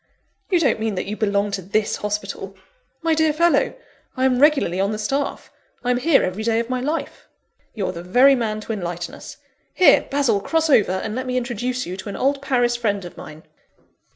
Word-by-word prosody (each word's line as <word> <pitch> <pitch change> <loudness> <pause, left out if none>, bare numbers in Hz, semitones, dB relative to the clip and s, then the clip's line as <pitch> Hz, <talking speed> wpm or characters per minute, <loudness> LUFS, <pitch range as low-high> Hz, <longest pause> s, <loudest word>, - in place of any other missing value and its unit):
"You 360 -3 +3
don't 280 -8 +2
mean 220 -2 -2
that 180 - -3
you 210 - -4
belong 205 -1 0
to 195 -1 -3
this 205 +4 -1
hospital?" 200 -2 -4 0.5
"My 330 -1 +2
dear 315 0 +3
fellow, 335 +3 +2 0.4
I 260 - +2
am 255 -1 +2
regularly 285 - +3
on 200 +2 +1
the 215 - -3
staff; 275 +7 -3 0.3
I'm 245 -1 +1
here 290 +2 +3
every 185 +4 -3
day 225 0 +1
of 235 +2 -3
my 255 -1 -1
life." 300 +5 -4 0.5
"You're 200 -4 -2
the 170 -2 -7
very 245 +10 +5
man 220 -4 -1
to 225 - -4
enlighten 175 -3 -5
us. - - -10 0.4
Here, 365 - +5
Basil, 275 -7 +2
cross 320 +5 0
over, 210 -8 +4
and 190 +3 -3
let 255 +2 -4
me 255 0 -1
introduce 250 +1 -2
you 180 +1 -6
to 195 - -7
an 200 - -5
old 275 +1 0
Paris 245 -3 +1
friend 205 -5 -1
of 175 - -10
mine. 155 +1 -11
230 Hz, 205 wpm, -21 LUFS, 200-270 Hz, 0.5 s, very